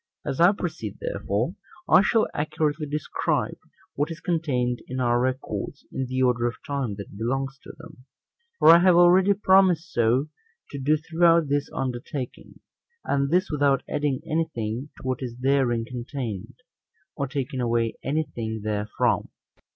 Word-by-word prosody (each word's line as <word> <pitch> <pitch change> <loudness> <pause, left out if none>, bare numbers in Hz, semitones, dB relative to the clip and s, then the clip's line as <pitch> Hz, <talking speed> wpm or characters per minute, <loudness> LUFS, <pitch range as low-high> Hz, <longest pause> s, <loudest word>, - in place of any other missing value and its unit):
As 135 - -3
I 175 +3 +7
proceed, 205 - -5
therefore, - - -2 0.3
I 185 - +7
shall 220 +2 +2
accurately 150 0 -1
describe 150 +1 -2 0.3
what 145 +3 -1
is 165 0 -7
contained 130 -9 -1
in 130 +1 -4
our 120 -1 +2
records, 130 +2 -3
in 130 - -2
the 130 +1 0
order 120 -1 +2
of 120 - -3
time 140 -8 -2
that 100 0 -9
belongs 135 +5 -2
to - - -11
them; 160 -5 -14 0.5
for - - +6
I 165 +1 +10
have 180 0 +5
already 180 +3 +6
promised 190 -4 +3
so 120 +5 +2 0.4
to 140 - -5
do 150 +3 +2
throughout 165 0 +3
this 145 0 0
undertaking; 130 +1 -5 0.4
and 140 0 +1
this 180 +3 +1
without 140 -3 +2
adding 145 -2 -1
any 165 0 0
thing 115 +5 -3
to - - -14
what 130 -1 -2
is 120 -2 -5
therein 125 -3 +1
contained, 120 -4 -6 0.6
or 140 -2 -2
taking 135 -1 -3
away 115 -1 +1
any 155 +4 0
thing 110 -6 -5
therefrom. 105 -1 0
140 Hz, 155 wpm, -25 LUFS, 125-160 Hz, 0.6 s, I